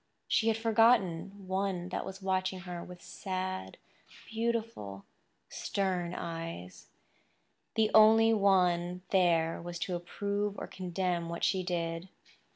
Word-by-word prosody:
She 225 - +2
had 225 -1 +3
forgotten 210 -4 +2
one 190 -2 -1
that - - -3
was 190 0 -8
watching 185 0 0
her 175 -1 -6
with 180 -1 -11
sad, 185 -1 -4 0.5
beautiful, 225 - -3 0.4
stern 180 -3 -2
eyes—the 165 - -6
only 225 +1 +7
one 180 -3 +2
there 170 -4 +3
was 175 0 -6
to 170 +2 -2
approve 200 +4 -2
or - - -4
condemn 180 -2 -2
what 170 - -5
she 190 - +2
did. 170 0 -3
185 Hz, 115 wpm, -31 LUFS, 175-200 Hz, 0.5 s, only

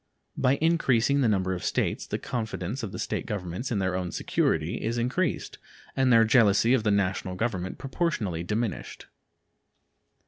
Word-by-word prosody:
By 130 +2 +2
increasing 140 -4 +2
the 125 - +3
number 95 -3 +1
of 90 - -4
the - - -2
States - - -1
the - - -2
confidence 110 0 -4
of 110 -5 -5
the - - -6
State - - -3
governments 95 +4 -4
in 115 - 0
their 95 -1 0
own 90 -2 -2
security 80 +2 0
is 115 +2 -1
increased 130 +10 -1 0.4
and 130 -1 +3
their 115 -1 +7
jealousy 115 0 +4
of 130 - +3
the 110 - 0
National 95 -2 0
Government 95 -3 -2
proportionally 130 - -2
diminished. 105 +3 -3
110 Hz, 165 wpm, -27 LUFS, 95-125 Hz, 0.4 s, their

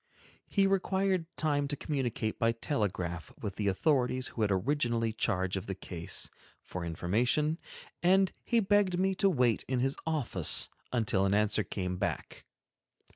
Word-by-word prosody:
He 200 -1 +2
required 190 -2 +1
time 145 -3 +1
to 145 - -3
communicate 130 -7 -2
by 115 0 +2
telegraph 90 - -3
with 100 -2 -5
the 105 - -1
authorities 130 +4 +1
who 115 - -6
had 105 - +2
originally 115 +2 0
charge 95 -4 0
of 95 - -4
the 95 - -3
case, 85 -3 -3 0.3
for 90 - -6
information, 120 - 0 0.4
and 190 +2 +4
he 235 -1 +2
begged 200 -2 +2
me 190 +1 +2
to 195 +1 +2
wait 125 - +2
in 130 -1 0
his 135 +2 0
office 125 - +4 0.2
until 110 -5 +1
an 100 - +2
answer 105 0 +2
came 90 -2 -4
back. - - -4
125 Hz, 150 wpm, -31 LUFS, 100-160 Hz, 0.4 s, and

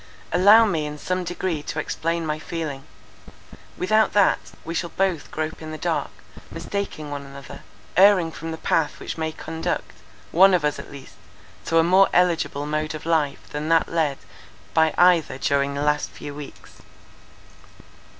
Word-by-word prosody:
"Allow 205 +6 +7
me 160 -7 -1
in 150 0 -7
some 185 +5 -2
degree 175 -2 -3
to 155 - -5
explain 165 +2 -2
my 155 0 -2
feeling; 155 -4 -5 0.9
without 215 +4 +2
that, 205 -2 +4 0.3
we 165 - -4
shall 170 +1 -2
both 185 -5 -1
grope 155 +1 -4
in 155 - -7
the 155 - -6
dark, - - -1 0.4
mistaking 175 -7 -5
one 140 -1 -5
another; 140 0 -11 0.3
erring 185 -3 +5
from 160 +3 -7
the 160 - -5
path 160 -2 0
which - - -5
may 160 -1 -2
conduct, 160 +1 -4 0.4
one 190 +2 +6
of 165 -4 0
us 150 - -1
at - - -10
least, 140 -2 -12 0.5
to 165 - +1
a 165 - +6
more 185 +3 +5
eligible 170 -5 +1
mode 155 +1 -2
of 155 - -9
life 155 -4 0
than 150 +2 -4
that 165 0 +3
led 155 -5 0 0.6
by 160 -1 +4
either 175 -7 +4
during 140 0 0
the 140 - -2
last 150 0 +1
few 145 - -9
weeks. 145 -1 -11
160 Hz, 165 wpm, -23 LUFS, 150-175 Hz, 0.9 s, Allow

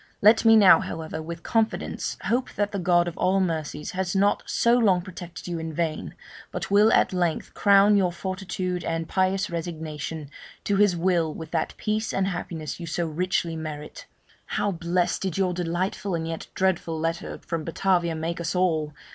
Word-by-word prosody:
Let 220 +3 +5
me 225 0 +8
now, 200 -4 +8
however, 160 -1 -5
with 170 +1 -7
confidence 225 -1 -1
hope 250 +3 0
that 205 0 -1
the 200 - -3
God 175 -1 +3
of 170 - -4
all 190 +1 +3
mercies 155 -4 -2
has 185 0 -2
not 200 +1 +3
so 235 - +2
long 195 -7 +3
protected 180 -2 -9
you 170 -2 -3
in 160 0 -4
vain, 160 0 -3 0.4
but - - -5
will 210 +2 +6
at - - +3
length 175 -3 -1
crown 200 0 +5
your 190 -3 +3
fortitude 185 0 -4
and 165 0 -2
pious 190 +1 0
resignation 160 -3 -5 0.3
to 200 - +1
His 200 -3 +4
will 170 -2 +1
with 160 0 -8
that 160 -2 -1
peace 215 +1 -1
and 195 - +1
happiness 170 -4 -5
you 170 - -6
so 170 +2 -1
richly 170 +1 -1
merit. 155 -2 -7 0.4
How 205 - 0
blest 175 0 0
did 190 -3 -2
your 185 -2 +1
delightful 180 +2 -2
and 160 -1 -3
yet 165 0 -5
dreadful 175 -4 0
letter 165 +1 -3
from 165 -2 -4
Batavia 170 0 +1
make 165 +2 -3
us 170 +2 -2
all! 160 -5 +1
175 Hz, 180 wpm, -25 LUFS, 165-195 Hz, 0.4 s, me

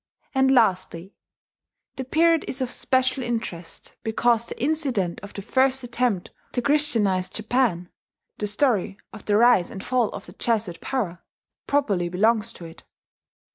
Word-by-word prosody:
And 265 -1 +3
lastly, 190 -7 +1 0.8
the 265 - -4
period 325 +4 +3
is 265 - -3
of 255 -2 -2
special 260 0 +1
interest 225 -8 -5
because 235 +1 +1
the - - -7
incident 260 - -1
of 200 0 -9
the 200 - -6
first 265 +3 +1
attempt 240 -6 -1 0.2
to 245 - 0
christianize 225 -11 +2
Japan 215 -5 0 0.5
the 210 - -1
story 210 -3 +1 0.2
of 215 - -11
the 205 0 +2
rise 235 -6 +5
and 190 - -8
fall 245 -3 +1
of - - -8
the - - -12
Jesuit 210 -7 -1
power 200 -10 -3 0.5
properly 205 -12 +1
belongs 220 +4 +1
to 170 - -10
it. 165 0 -13
230 Hz, 145 wpm, -24 LUFS, 195-260 Hz, 0.8 s, rise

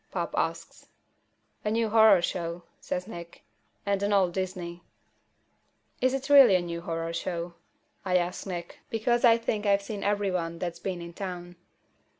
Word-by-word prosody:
Pop - - -3
asks. - - -3 0.8
"A 210 - 0
new 225 +1 +1
horror 220 -5 +6
show," 170 -1 -3 0.2
says 180 - -3
Nick. 170 -5 -10 0.4
"And 200 -1 0
an 200 +1 0
old 190 -4 +3
Disney." 180 -2 -4 1.2
"Is 255 +1 +3
it 270 0 -4
really 275 -8 +8
a 180 - +3
new 170 -1 -5
horror 165 -1 -3
show?" 170 0 -3 0.5
I 185 -1 +2
ask 180 +2 -2
Nick, 175 -2 -6
because 235 +2 +1
I 230 -2 +7
think 220 -2 -2
I've 200 0 +3
seen 200 0 -5
every 205 -1 +1
one 170 -2 -2
that's 170 -1 -4
been 180 -2 -4
in 170 0 -9
town. 175 -2 -6
185 Hz, 160 wpm, -28 LUFS, 175-210 Hz, 1.2 s, really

